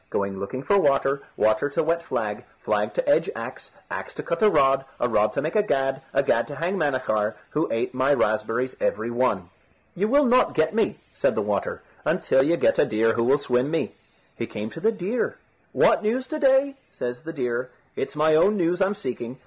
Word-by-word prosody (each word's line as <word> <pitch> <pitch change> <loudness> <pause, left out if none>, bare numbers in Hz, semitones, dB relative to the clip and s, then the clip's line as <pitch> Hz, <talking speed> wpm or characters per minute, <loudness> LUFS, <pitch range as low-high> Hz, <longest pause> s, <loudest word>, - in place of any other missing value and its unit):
Going 100 -1 -2
looking 130 +7 -5
for 200 +4 +3
water, 140 -3 +2 0.2
water 110 +6 +2
to 160 +3 0
wet 165 +2 0
flag, - - -3 0.2
flag - - 0
to - - -1
edge - - +3
axe, - - -7 0.2
axe - - -5
to - - -5
cut - - -3
a 215 - +6
rod, 135 -6 +3 0.2
a 120 - +1
rod 105 -2 +2
to - - -1
make 155 +5 -3
a 210 - +5
gad, 135 -9 0
a 140 - +2
gad 115 -3 +1
to 145 - -7
hang 170 +6 -1
Manachar, 130 - 0 0.2
who 155 - -1
ate 115 +3 -1
my 130 +2 +2
raspberries 115 0 0
every 110 +3 -1
one." 120 -8 0 0.4
"You 200 +4 0
will 285 +5 +4
not 250 +1 +3
get 155 +3 +2
me," 225 - 0 0.2
said - - +1
the - - 0
water, - - -2 0.2
"until 135 - +2
you 165 +5 +2
get 280 - +2
a - - +5
deer 110 +1 +2
who 115 - 0
will 135 +4 +4
swim 125 -1 0
me." 165 +1 -1 0.4
He - - -4
came 105 +2 -6
to - - -8
the 220 +6 +2
deer. 215 +3 -2 0.3
"What - - +4
news 235 +5 -1
to 310 - -3
day?" 275 0 +3
says 125 0 -5
the 165 +1 -7
deer. 125 -3 -2 0.3
"It's 135 - -4
my 155 +1 +3
own 200 +7 +4
news 175 +1 0
I'm 195 +2 +2
seeking. 125 -6 -5
140 Hz, 215 wpm, -24 LUFS, 125-190 Hz, 0.4 s, a